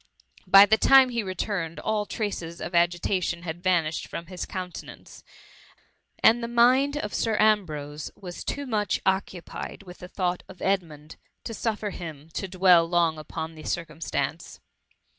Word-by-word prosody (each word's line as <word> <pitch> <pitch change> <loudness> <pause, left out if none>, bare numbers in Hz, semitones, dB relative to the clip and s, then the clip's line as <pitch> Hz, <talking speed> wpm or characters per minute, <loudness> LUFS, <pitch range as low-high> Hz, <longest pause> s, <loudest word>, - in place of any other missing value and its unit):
By 195 +2 +9
the 220 +2 +3
time 270 -1 +7
he 235 -2 -1
returned, 185 -3 -3
all 215 -1 -1
traces 175 -6 -4
of 170 +3 -6
agitation 175 0 +1
had 175 0 -6
vanished 170 -4 0
from 170 - -6
his 180 0 -6
countenance; 185 -2 -8 1.0
and 230 +2 +6
the 235 - -3
mind 255 +5 +4
of 210 -8 -4
Sir 225 -2 0
Ambrose 155 -9 0
was 180 -3 -8
too 285 - -3
much 215 -5 0
occupied 190 0 -3
with 180 -2 -12
the 180 - -9
thought 180 -1 -2
of 190 - -12
Edmund, 160 -6 -2 0.3
to 225 - -5
suffer 215 -2 -2
him 160 -4 -8
to 195 - -3
dweU 180 -2 +4
long 170 -2 +2
upon 160 +1 -6
the 155 - -11
circumstance. 165 -1 -4
185 Hz, 150 wpm, -26 LUFS, 170-210 Hz, 1.0 s, By